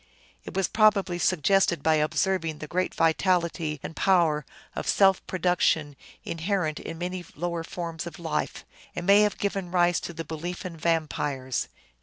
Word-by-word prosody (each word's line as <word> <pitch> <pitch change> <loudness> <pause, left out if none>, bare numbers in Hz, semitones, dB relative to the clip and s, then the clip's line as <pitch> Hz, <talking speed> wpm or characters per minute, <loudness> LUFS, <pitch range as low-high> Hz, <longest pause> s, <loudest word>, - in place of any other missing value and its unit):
It - - -8
was 195 -1 +2
probably 200 -5 +3
sug 175 -4 +1
gested 195 -1 +3
by 160 - +4
observing 160 +1 0
the 155 - -7
great 180 +4 -2
vitality 165 -2 +1
and 160 - -6
power 165 -6 +2 0.3
of - - -4
self 195 -2 +4
produc 180 -1 0
tion 145 -3 +2 0.3
inherent 165 -2 -1
in 165 - -7
many 180 +1 -4
lower 170 0 -3
forms 170 -1 -5
of 170 - -8
life, 165 -2 -3 0.3
and 175 - -4
may 200 +2 +7
have 210 -1 +2
given 195 -3 -2
rise 175 -1 +3
to - - -6
the 165 0 -6
belief 175 +3 -5
in 175 -2 -5
vampires. 150 -5 -1
175 Hz, 165 wpm, -26 LUFS, 160-185 Hz, 0.3 s, may